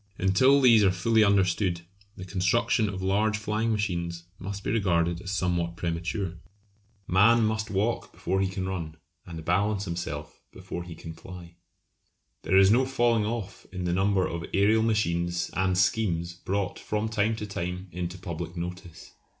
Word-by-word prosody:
Until 115 +9 +4
these 115 -5 +6
are 95 - +5
fully 110 +5 +3
understood 95 -3 +2 0.4
the 95 - -7
construction 100 +4 +1
of 95 -1 -5
large 105 +3 +1
flying 110 +1 -1
machines 85 -5 -2 0.2
must 100 +1 -6
be - - -1
regarded 85 -5 +1
as 100 - -7
somewhat 90 -3 -1
premature. 85 +1 -3 0.7
Man 110 +6 +5
must 110 0 -1
walk 105 +4 -1
before 95 +2 -1
he 95 - +2
can 95 0 -4
run, 85 -5 -4 0.3
and 80 -2 -8
balance 100 +3 +1
himself 80 -4 -5
before 85 - -7
he 85 -2 -9
can 80 0 -9
fly. 85 0 -11 0.9
There 95 - +2
is 95 +1 +7
no 125 +4 +5
falling 120 -5 +2
off 110 -3 -5
in 90 -1 -5
the 90 -1 0
number 95 0 +2
of 85 - -4
aërial 105 +6 +2
machines 85 -6 0
and 95 -1 +1
schemes 90 -3 +1
brought 95 +2 -3
from 105 +1 -2
time 110 0 +1
to 105 - -5
time 90 -1 -4
into 90 +1 -4
public 85 -1 -6
notice. 90 0 -7
95 Hz, 160 wpm, -27 LUFS, 85-105 Hz, 0.9 s, is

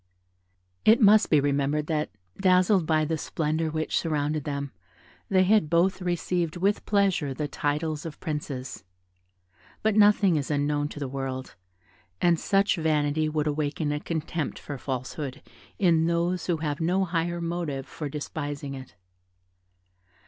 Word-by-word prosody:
It 220 +3 +6
must 215 -1 +6
be 150 - +5
remembered 145 +1 0
that, 155 -1 -1 0.3
dazzled 185 -2 +3
by 155 -1 +2
the 160 0 -2
splendour 160 +1 -1
which 155 0 -1
surrounded 150 -2 -1
them, 140 -1 -3 0.6
they 185 -1 +4
had 195 -4 +3
both 175 +4 +2
received 175 -1 -1
with 200 +3 0
pleasure 190 -9 +1
the 150 +2 -2
titles 150 +1 -2
of 160 -2 -8
princes; 145 -4 -5 1.0
but 215 -1 +2
nothing 205 -4 +5
is 140 - -3
unknown 145 0 0
to 145 - -9
the 140 - -3
world, 130 -1 -5 0.7
and 170 -2 +3
such 200 0 +2
vanity 155 -1 +1
would 150 -1 -1
awaken 150 0 -1
a 150 - -1
contempt 160 0 -3
for 145 -3 -7
falsehood, 135 +2 -5 0.3
in 165 -5 +3
those 170 +1 0
who 175 -2 +1
have 150 -1 -3
no 185 +4 +2
higher 170 0 -1
motive 165 -5 -3
for 150 -2 -6
despising 145 -1 -5
it. 130 -2 -10
155 Hz, 140 wpm, -26 LUFS, 145-175 Hz, 1.0 s, It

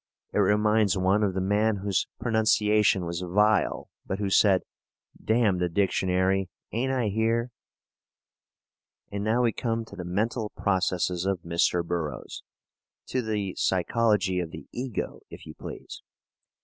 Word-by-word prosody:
It - - +1
reminds 105 0 +3
one 95 +3 +2
of 100 -3 0
the 95 - 0
man 105 +3 +2
whose 100 -3 0
pronunciation 105 -4 +2
was 85 +1 -3
vile, 105 +4 +2 0.2
but 95 - -3
who 100 -1 -2
said: 95 -1 +4 0.6
"Damn 110 -5 +2
the 90 -1 0
dictionary; 95 0 +1 0.2
ain't 125 +4 -1
I 125 -5 0
here?" 115 +3 0 1.6
And 100 0 -3
now 115 +3 +2
we 115 - +3
come 115 -1 -2
to - - -12
the 90 - -6
mental 105 +5 -1
processes 90 -2 0
of 95 -3 -1
Mr. 85 0 +1
Burroughs 85 -6 -4 0.7
to 130 - 0
the 105 -4 -2
psychology 95 0 +1
of 85 -2 -3
the 80 +1 -9
ego, 125 -3 -4
if - - -11
you 75 - -9
please. - - -9
100 Hz, 140 wpm, -27 LUFS, 90-110 Hz, 1.6 s, said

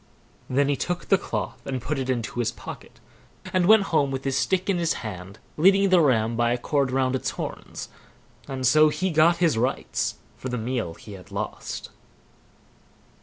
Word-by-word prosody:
Then 135 +2 +2
he 145 - +2
took 175 +6 -3
the 195 - +6
cloth 105 - -4
and 130 -1 -3
put 135 +4 -3
it 130 0 -3
into 120 -1 -2
his 120 -1 +1
pocket, - - -10 0.5
and 180 -1 +3
went 220 -1 +7
home 145 -3 +3
with 135 0 -4
his 135 -1 -1
stick 185 +6 +1
in 190 -3 +1
his 170 -1 +1
hand, 95 -1 -7 0.2
leading 195 +4 +5
the 185 -2 +6
ram 115 -6 +2
by 120 0 +2
a 120 - +1
cord 140 +2 0
round 130 0 +1
its 130 - -1
horns; - - -6 0.6
and 130 -1 -3
so 155 +4 +6
he 175 +5 -1
got 165 +2 +4
his 165 -9 +2
rights 125 +3 -1 0.2
for 130 - -5
the 125 - -2
meal 115 -7 -3
he 105 - -11
had 95 0 -12
lost. 100 +1 -5
135 Hz, 185 wpm, -25 LUFS, 120-165 Hz, 0.6 s, went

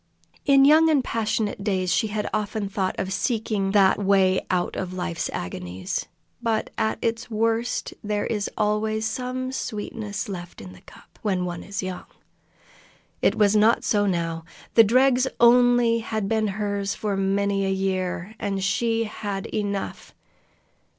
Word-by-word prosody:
In 275 -1 +6
young 315 +3 +6
and 290 -4 +3
passionate 220 -3 -1
days 185 -4 0
she 220 - +2
had 210 0 -3
often 210 0 -2
thought 190 -1 -2
of 190 0 -2
seeking 210 -1 -1
that 195 -1 +5
way 190 -2 +2
out 180 -1 0
of 185 -1 -4
life's 180 -2 -3
agonies, 90 +1 -4 0.3
but 225 -2 -1
at 220 - 0
its 230 +1 -1
worst 225 +2 -1
there 210 0 -1
is 210 -3 -2
always 215 +1 0
some 255 +3 -3
sweetness 210 -4 -4
left 175 -3 -7
in 95 -1 -10
the 90 - -16
cup - - -18
when 185 -4 0
one 175 -1 -4
is 200 -1 -5
young! 185 -1 -6 1.1
It - - +3
was 210 -1 +3
not 215 +2 +4
so 205 -1 +2
now. 165 -3 -1 0.3
The 225 - +8
dregs 255 +3 +4
only 240 -1 +5
had 220 -3 -3
been 220 0 +1
hers 200 -1 -2
for 210 -2 -2
many 195 +1 +1
a 195 - 0
year, 190 0 -2
and 195 -2 -2
she 230 +3 +1
had 205 -3 -5
enough. 200 -2 -3
205 Hz, 150 wpm, -24 LUFS, 195-225 Hz, 1.1 s, The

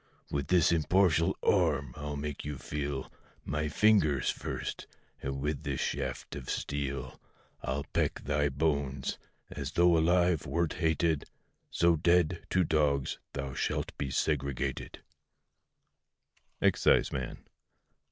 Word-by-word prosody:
With 70 -2 -1
this 90 -3 +4
impartial 85 +1 +3
arm 70 -4 +2
I'll 75 0 -4
make 75 0 -4
you 75 -1 -4
feel 70 -1 -4 0.3
My 75 +1 -1
fingers 75 - +3
first, - - -5 0.3
and 70 0 -3
with 75 0 -2
this - - -3
shaft - - -3
of 65 -3 -7
steel 70 -1 -3 0.4
I'll 70 +2 -2
peck - - -1
thy 70 +1 +1
bones! 70 -2 -1 0.3
as 70 +1 -5
thou 85 - +3
alive 85 0 +3
wert 85 -2 0
hated, 80 -2 +1 0.4
So 85 -1 +3
dead, 85 +1 +2
to 95 - +3
dogs 75 -4 +1
thou 70 -1 -4
shalt - - -2
be 70 - -1
segregated. 70 -1 -2 1.6
EXCISEMAN. 65 -3 +2
75 Hz, 115 wpm, -31 LUFS, 70-80 Hz, 1.6 s, this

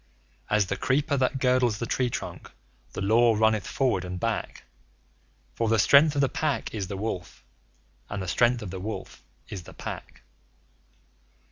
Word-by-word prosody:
As 105 -1 +3
the - - -3
creeper 140 +3 +1
that 130 0 +1
girdles 125 -4 +2
the 120 - -3
tree 125 +2 0
trunk - - -6 0.4
the - - -4
Law 115 +3 +4
runneth 110 -1 +2
forward 120 -9 0
and 90 0 -5
back - - -3 0.9
For 115 -1 -1
the 115 - +3
strength 145 +7 +6
of 140 - +2
the 135 - +4
Pack 145 +2 -2
is 100 -4 -3
the 100 0 -5
Wolf, 95 -4 -5 0.7
and 105 - -4
the 95 - -4
strength 120 +6 +2
of 95 - -6
the 95 - -5
Wolf 110 +4 -6 0.3
is 100 - -6
the - - -14
Pack. - - -8
115 Hz, 165 wpm, -27 LUFS, 100-130 Hz, 0.9 s, strength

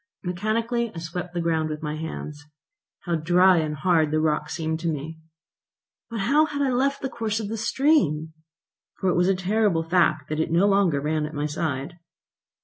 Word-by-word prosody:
Mechanically 220 +6 -1
I - - -7
swept 170 +2 -5
the 175 - 0
ground 160 -2 0
with 155 0 -5
my 150 0 -3
hands. 150 -2 -6 0.6
How 175 - -3
dry 180 +3 +4
and 155 -2 -1
hard 160 0 +2
the 155 +1 +1
rock 155 -1 0
seemed 160 -1 -2
to 170 - -3
me! 160 +1 -4 0.9
But 230 -3 -3
how 290 +9 +4
had 285 -2 -2
I 265 - +1
left 275 +3 0
the - - 0
course 225 -3 -2
of 210 -2 -4
the 225 - -3
stream? 215 - +1 0.7
For 190 - +1
it 175 - +1
was 175 +1 +3
a 195 - +3
terrible 190 -2 +1
fact 165 -3 +2
that 155 0 -2
it 160 - 0
no 170 +4 +3
longer 195 -7 +3
ran 150 +1 -1
at 155 - -9
my 145 +1 -1
side. 150 +1 -3
170 Hz, 195 wpm, -24 LUFS, 155-210 Hz, 0.9 s, dry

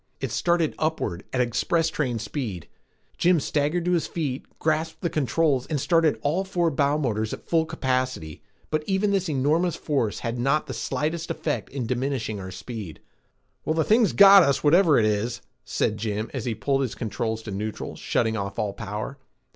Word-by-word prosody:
It - - -3
started 170 -3 +1
upward 155 - -2
at 130 - +1
express 160 +7 +1
train 130 -7 -1
speed. 110 - -5 0.5
Jim 175 -1 +4
staggered 150 +4 0
to 180 - +1
his 170 -3 +1
feet, 140 -6 -3
grasped 160 +1 -1
the 170 -4 -1
controls 150 -3 +1
and 150 -3 -1
started 165 +1 +3
all 160 +7 +1
four 175 -3 0
bow 140 +1 +2
motors 110 -7 -1
at - - -9
full 160 -1 +2
capacity, 130 - -2 0.3
but 155 -1 0
even 195 +1 +1
this 190 -3 0
enormous 155 +5 +1
force 135 -11 -1
had 115 +1 -3
not 140 +5 +1
the - - -6
slightest 160 +2 -2
effect 150 - -2
in 130 -3 -4
diminishing 125 -3 -2
our 95 -1 -6
speed. 100 -3 -7 0.6
"Well, 155 - 0
the 160 - +2
thing's 220 +3 +3
got 200 0 +9
us, 140 -5 +2
whatever 165 +1 +5
it 110 - +4
is," 115 +3 -1 0.2
said 110 -1 0
Jim 110 0 -3
as 130 -5 -4
he 120 -3 -1
pulled 135 +5 0
his 130 -4 -2
controls 110 -1 -3
to 110 - -6
neutral, 105 +2 -4
shutting 110 -1 0
off 100 -2 -4
all 105 -2 -1
power. 110 +6 -5
140 Hz, 180 wpm, -25 LUFS, 110-160 Hz, 0.6 s, got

